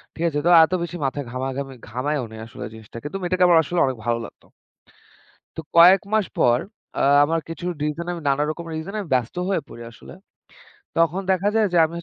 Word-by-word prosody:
ঠিক 165 - -4
আছে। 145 -2 -2
তো 175 - +4
এত 165 - 0
বেশি 175 +1 -5
মাথায় 140 +1 -3
ঘামা-ঘামি 135 +1 -4
ঘামায়ও 130 +3 -2
নাই 110 - -9
আসলে - - -8
জিনিসটাকে, 110 +4 -9
তো - - -2
মেয়েটাকে 180 0 +2
আমার 170 -2 +6
আসলে 175 +4 -2
অনেক 130 -3 -2
ভালো 120 0 0
লাগতো। - - -15 1.1
তো - - -3 0.2
কয়েক 180 +3 +8
মাস 215 -3 +2
পর 120 0 +4 0.4
আ - - +3 0.2
আমার 165 +2 0
কিছু 165 +2 -6 0.2
রিজনে, 170 +4 -3 0.2
নানা 140 +1 +2
রকম 170 +2 -6
রিজনে 180 +7 -5
আমি 175 - -11
ব্যস্ত 125 +2 -1
হয়ে 190 -5 0
পড়ি 120 - -10
আসলে। 115 - -13 0.8
তখন 165 +3 +2
দেখা 190 +2 +1
যায় 220 -1 +3
যে, 175 - +3
আমি 165 - -7
160 Hz, 195 wpm, -22 LUFS, 130-175 Hz, 1.1 s, কয়েক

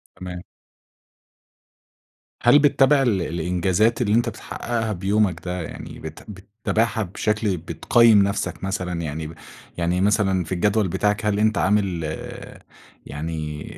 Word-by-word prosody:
تمام. 90 -1 -7 2.0
هل 145 - +7
بتتابع 140 0 +4
ال 110 -8 +1
الإنجازات 90 +7 0
اللي 105 -3 +1
أنت 120 +1 +2
بتحققها 115 0 -4
بيومك 95 -2 0
ده، 90 0 -3
يعني 80 - -8
بت 80 0 -9
بتتابعها 110 +3 -2
بشكل 105 +1 -1
بتقيّم 110 +5 +4
نفسك 100 0 -2
مثلًا، 90 -3 -3
يعني 80 0 -4
ب 80 - -9 0.4
يعني 90 +1 0
مثلًا، 95 -2 +2
في 80 - -12
الجدول 105 +3 +1
بتاعك 105 +4 0
هل 105 -1 +1
أنت 110 0 +2
عامل 95 -1 +1 1.0
يعني 75 0 -5
100 Hz, 120 wpm, -23 LUFS, 85-110 Hz, 2.0 s, هل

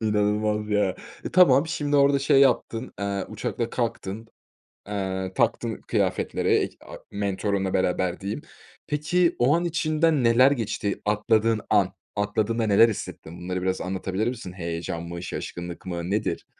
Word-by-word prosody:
İnanılmaz 105 0 0
ya, 105 -3 +2 0.3
eee, - - -3
tamam 160 -5 +6
şimdi 145 -3 0
orada 140 0 +5
şey 135 0 +4
yaptın, 125 -2 +2
aaa, 100 -1 -2
uçakla - - -3
kalktın, 105 +4 -3 0.6
aaa, 95 -2 -3
taktın 115 -1 0
kıyafetleri - - 0
ek - - +1
a - - -9 0.2
mentorunla 100 -1 -1
beraber 90 -1 0
diyeyim. 100 +8 -4 0.5
Peki, 165 +4 +1
o 130 +5 +4
an 170 +1 0
içinden 155 -3 +1
neler 120 +3 +6
geçti 110 -5 -2
atladığın 110 +1 +2
an? - - +3 0.2
Atladığında 110 +2 0
neler 105 +3 +6
hissettin? 85 -5 -7
Bunları 90 +1 -3
biraz 95 0 -1
anlatabilir 95 +3 -2
misin? 115 -7 -5
Heyecan 85 -2 -4
mı, 85 0 -6
şaşkınlık 85 -1 -6
mı 85 -1 -4
nedir? 105 +1 -1
105 Hz, 140 wpm, -25 LUFS, 95-125 Hz, 0.6 s, tamam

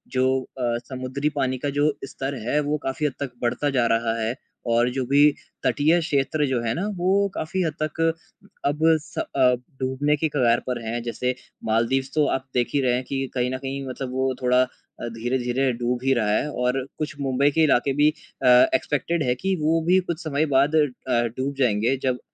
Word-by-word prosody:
जो 130 0 +3 0.3
अ, 120 -1 0
समुद्री 130 +3 -2
पानी 130 0 0
का 145 - -2
जो 150 0 +3
स्तर 135 +2 -4
है 150 +4 +2
वो 150 +1 0
काफ़ी 135 +3 -1
हद 145 - 0
तक 140 -3 -3
बढ़ता 125 +4 0
जा 125 -4 +2
रहा 115 0 -1
है। 115 +3 -1 0.3
और 120 +1 +3
जो 130 0 -2
भी 140 +1 +3 0.4
तटीय 160 +4 +3
क्षेत्र 150 -1 0
जो 130 -2 0
है 115 -1 -1
ना 185 +5 -2
वो 190 +3 +2
काफ़ी 180 +4 -2
हद 160 -3 -1
तक 155 +1 -4 0.7
अब 145 +2 0 0.2
स 170 - -15
अ, - - -1 0.5
डूबने 135 +3 +1
की 160 +1 0
कगार 120 -5 +3
पर 125 -2 -2
हैं। 115 +1 -2
जैसे 125 +1 -1 0.3
मालदीव्स 120 +5 +1
तो 150 - +4
आप 130 - -13
देख 120 -1 +1
ही 140 - +2
रहे 125 -2 +2
हैं 125 - 0
कि 135 -1 -2
कहीं 125 -1 0
न - - -1
कहीं 135 +1 -5
मतलब 130 0 -5
वो 130 0 0
थोड़ा 125 0 +4
अ, 125 -1 -9
धीरे-धीरे 125 +3 -1
डूब 120 0 0
ही 135 0 +3
रहा 110 -4 +1
है 150 +7 +1
और 125 0 -1
कुछ 155 0 -4
मुंबई 135 +1 +2
के 160 +3 +3
इलाके 140 -2 +3
भी 150 - +6
अ, 150 -3 -5 0.3
एक्सपेक्टेड 150 +5 0
है 125 -1 +1
कि 190 +7 -1
वो 160 +2 +2
भी 185 +1 +5
कुछ 165 +2 -6
समय 155 -1 0
बाद 140 +4 +3
अ, 155 -1 +5 0.5
डूब 135 +2 -1
जाएँगे 115 0 +2
जब 125 -1 0
135 Hz, 205 wpm, -24 LUFS, 125-150 Hz, 0.7 s, भी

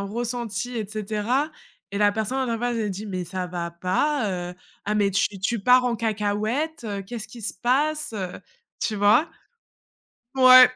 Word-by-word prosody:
ressenti 235 +2 -3
et 215 -3 -2
cetera, 215 +7 -1 0.4
et 200 - -4
la 205 0 +4
personne 240 +4 -1
en 230 - -1
face 240 0 -1
elle 215 -3 -1
dit: 205 +3 -5
«Mais 185 -2 -3
ça 180 +1 -4
va 175 -1 -4
pas, 185 - 0
heu, - - -10 0.3
ah 210 +1 0
mais 200 -1 +3
tu 195 - +3
tu 230 +5 0
pars 250 +4 +5
en 235 -2 0
cacahuète, 220 +7 -1 0.2
qu'est-ce 230 -1 -5
qui 235 +1 -11
se 215 - 0
passe» 285 +7 +1
heu, 190 -4 -3 0.5
tu 215 - -1
vois? 210 +10 +4 1.1
Ouais, 255 -1 +9
220 Hz, 165 wpm, -24 LUFS, 200-245 Hz, 1.1 s, Ouais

